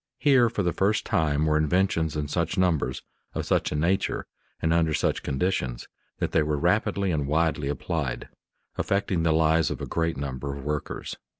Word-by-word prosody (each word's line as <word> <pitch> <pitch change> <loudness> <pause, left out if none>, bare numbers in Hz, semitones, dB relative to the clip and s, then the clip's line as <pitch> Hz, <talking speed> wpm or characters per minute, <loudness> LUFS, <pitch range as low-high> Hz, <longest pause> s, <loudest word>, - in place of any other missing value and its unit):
Here 130 -5 +4
for 105 -3 -2
the 85 -1 0
first 105 +2 +1
time 75 -1 +1
were 75 0 +3
inventions 80 0 +1
in 75 -1 -2
such 85 +5 -1
numbers, 80 -9 +1 0.3
of - - -2
such - - +1
a - - -2
nature, 85 +6 0 0.3
and 80 0 +1
under 80 -2 +2
such - - 0
conditions, 65 -5 -2 0.3
that - - -2
they 80 - +3
were 75 -1 0
rapidly 95 +6 +1
and 75 -4 -1
widely 80 -1 +1
applied, 70 -1 -3 0.5
affecting 100 -3 0
the 80 0 +2
lives 80 0 +3
of - - -4
a - - -4
great 80 -2 -1
number 70 0 -4
of 70 - -8
workers. 75 0 -4
80 Hz, 180 wpm, -26 LUFS, 75-90 Hz, 0.5 s, Here